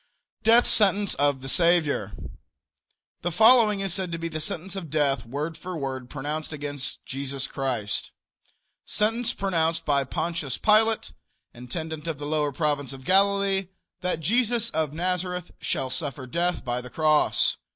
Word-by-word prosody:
DEATH 230 +2 +5
SENTENCE 205 -1 +3
OF 145 -2 +1
THE - - -6
SAVIOR. 155 - +2 1.1
The 175 - -1
following 220 +2 +5
is 195 -3 0
said 185 -2 -2
to 165 - -2
be 165 0 -4
the 155 -1 -4
sentence 175 +5 -3
of 180 -5 -6
death, 140 -4 +1
word 150 +6 -3
for 180 +1 -6
word, 130 -3 -4
pronounced 150 +2 -4
against 145 -3 -4
Jesus 135 0 -4
Christ: 125 -6 -2 0.7
Sentence 225 +3 0
pronounced 165 -4 0
by 140 -2 +2
Pontius 150 +1 -3
Pilate, 220 - +3 0.4
intendent 160 +6 -6
of 160 -3 -2
the 145 - -6
lower 150 -1 0
province 145 -1 -1
of 135 -1 -10
Galilee, 195 0 +3 0.3
that 180 -3 -2
Jesus 230 +4 +2
of 155 -2 0
Nazareth 180 +1 -2
shall 130 - -2
suffer 140 -3 -2
death 170 +7 -1
by 120 0 -1
the 125 - -10
cross. 155 +3 +2
160 Hz, 150 wpm, -26 LUFS, 140-190 Hz, 1.1 s, DEATH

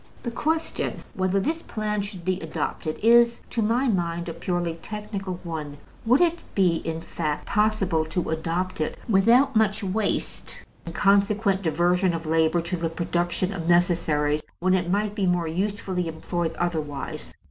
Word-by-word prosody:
The 235 - -3
question 320 +6 -2
whether 185 -2 +1
this 320 +10 -1
plan 210 -5 -2
should 195 -4 -7
be 185 0 0
adopted 155 0 -3
is, 235 +1 +5
to 230 - 0
my 235 +5 +2
mind, 170 -5 -1
a 165 - -3
purely 170 0 -2
technical 210 -3 -5
one: 155 -4 -5 0.3
would 255 +7 +5
it 345 -1 +3 0.2
be, 180 -4 +3
in 165 0 -4
fact, 155 -3 -3
possible 205 -6 +2
to 160 +1 -2
adopt 165 +2 -2
it 155 - -2
without 235 +6 +4
much 215 -1 +2
waste 200 +2 -2 0.3
and 165 - -6
consequent 200 0 +3
diversion 175 +2 +2
of 165 0 -5
labor 160 +1 +2
to 175 +2 -3
the 165 -1 -1
production 175 +3 -1
of 170 -3 -3
necessaries 160 -4 +2 0.2
when 185 +1 +2
it 180 -2 +1
might 205 +2 +1
be 200 -3 0
more 175 -2 +1
usefully 185 0 -2
employed 165 +1 -3
otherwise? 155 -5 -3
180 Hz, 160 wpm, -25 LUFS, 165-210 Hz, 0.3 s, is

